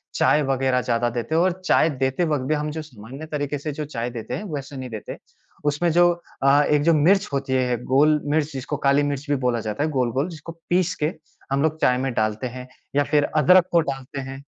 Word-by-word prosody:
चाय 150 - +3
वगैरह 135 -1 +1
ज़्यादा 120 -1 0
देते 120 +6 -3
हैं 165 - +4
और 185 +1 +3
चाय 165 - +4
देते 135 +3 -1
वक़्त 150 -5 -1
भी 155 - +2
हम 150 0 -2
जो 160 - -4
सामान्य 135 0 -10
तरीके 145 -1 -2
से 150 +2 -4
जो 150 +1 -5
चाय 120 -4 -4
देते 115 -2 -6
हैं, - - -3
वैसे 140 -1 -6
नहीं 130 -1 -6
देते। 110 -2 -7 0.5
उसमें 150 +4 +1
जो 175 +2 +5 0.3
अ, 140 +1 +5
एक 150 0 +2
जो 165 +2 +4
मिर्च 190 +7 +3
होती 135 -1 -1
है, 125 -2 +1
गोल 150 +4 +3
मिर्च 155 -1 +1
जिसको 135 -1 -4
काली 140 +1 +4
मिर्च 145 -1 -2
भी 145 - +3
बोला 120 -1 +1
जाता 110 +5 -3
है 155 - 0
गोल-गोल 130 +2 0
जिसको 165 -1 -9 0.2
पीस 180 0 +1
के 155 +4 +1 0.4
हम 135 0 +1
लोग 155 0 0
चाय 125 - +3
में 130 +1 -1
डालते 110 +2 -1
हैं 125 +1 -8 0.3
या 145 - +4
फिर 145 +1 +2
अदरक 180 +4 +6
को 170 - +5
डालते 135 -2 -5
हैं। 135 +1 -8
140 Hz, 225 wpm, -23 LUFS, 130-155 Hz, 0.5 s, अदरक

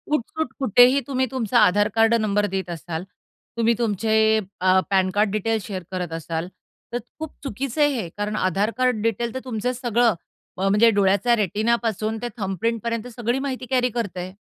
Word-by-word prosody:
उठसूट 315 +4 -3
कुठेही 255 +2 +5
तुम्ही 260 -2 0
तुमचा 245 -6 +1
आधार 205 +3 +4
कार्ड 225 0 +4
नंबर 210 -2 +1
देत 190 -1 -3
असाल, 170 0 -5 0.5
तुम्ही 230 0 +3
तुमचे 220 0 +2 0.2
अ, 185 0 +5
पॅन 190 -1 +2
कार्ड 210 0 +2
डिटेल्स 215 0 -1
शेअर 185 -3 -5
करत 180 -3 -4
असाल, 165 +1 -4 0.5
तर 240 - +1 0.2
खूप 315 -1 -6
चुकीचं 275 +2 -3
आहे 290 - +5
हे. 170 - -6
कारण 210 +1 -2
आधार 200 +2 0
कार्ड 250 -4 +1
डिटेल 230 +1 -1
तर - - -1
तुमचं 250 0 -2
सगळं 240 -2 +2 0.4
अ, 190 +1 0
म्हणजे 210 +4 +5
डोळ्याचा 200 +5 +3
रेटिनापासून 220 +1 0
ते 245 - -2
थंब 195 -2 -3
प्रिंटपर्यंत 230 0 -1
सगळी 240 +2 0
माहिती 265 -2 -4
कॅरी 250 -1 +2
करतं 220 -6 -4
आहे. 180 +1 -6
220 Hz, 175 wpm, -23 LUFS, 195-240 Hz, 0.5 s, कुठेही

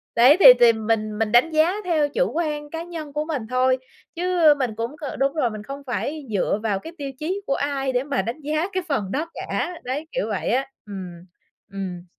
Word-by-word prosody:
đấy, 255 +8 +7
thì - - +5
thì 235 -1 +7
mình 215 -1 -1
mình 220 -1 0
đánh 245 +7 +5
giá 315 +4 +3
theo 310 -4 +2
chủ - - 0
quan 300 -3 -2
cá 330 +1 -5
nhân 320 -4 -7
của 300 +1 -1
mình 275 -9 -3
thôi, 255 +1 +2 0.4
chứ 345 -3 +4
mình 240 -5 -1
cũng 230 +6 -4
c 295 -2 -6
đúng 275 +1 +2
rồi, 275 -7 +1
mình 215 -1 -7
không 275 +5 -8
phải 285 +4 -3
dựa 205 0 0
vào 205 -3 0
cái 325 +8 -10
tiêu 280 -2 -5
chí 370 +6 -2
của 275 - +1
ai 275 -2 -1
để 250 +1 +1
mà 280 -2 -1
đánh 235 +7 -5
giá 310 +4 -1
cái 370 -1 -1
phần 205 -10 -1
đó 315 +4 -2
cả, 355 - -3
đấy, 285 +5 -4
kiểu - - -2
vậy - - -2
á, 265 +2 +1 0.2
ừm. 180 -3 -8 0.5
Ừm. 185 -3 -6
275 Hz, 220 wpm, -23 LUFS, 230-315 Hz, 0.5 s, đấy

